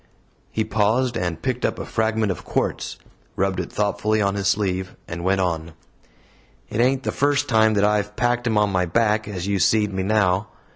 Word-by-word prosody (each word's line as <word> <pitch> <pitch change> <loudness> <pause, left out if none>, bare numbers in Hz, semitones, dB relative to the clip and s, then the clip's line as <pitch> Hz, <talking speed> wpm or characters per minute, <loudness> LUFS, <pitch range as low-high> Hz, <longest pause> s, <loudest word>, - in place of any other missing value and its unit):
He 110 - 0
paused, 115 +4 +1
and 90 -2 -3
picked 125 -2 -2
up - - 0
a - - -5
fragment 110 -2 0
of 90 - -6
quartz, - - -2 0.4
rubbed 95 0 0
it - - -4
thoughtfully 105 +1 0
on 100 -1 +1
his 100 -1 -1
sleeve, 95 -2 0
and 85 0 -6
went 95 +1 +2
on: 85 -2 -2 1.0
"It 110 - 0
ain't 130 +2 +2
the - - -1
first 145 0 +1
time 110 -3 +4
that 100 0 +3
I've 105 0 0
packed 120 +1 0
him 110 -2 +1
on 105 -1 +3
my 90 -1 +1
back, 105 +3 +1
as 95 -4 -4
you 100 -1 0
see'd 105 +3 +2
me 95 - -1
now. 100 0 +2
105 Hz, 195 wpm, -22 LUFS, 95-110 Hz, 1.0 s, time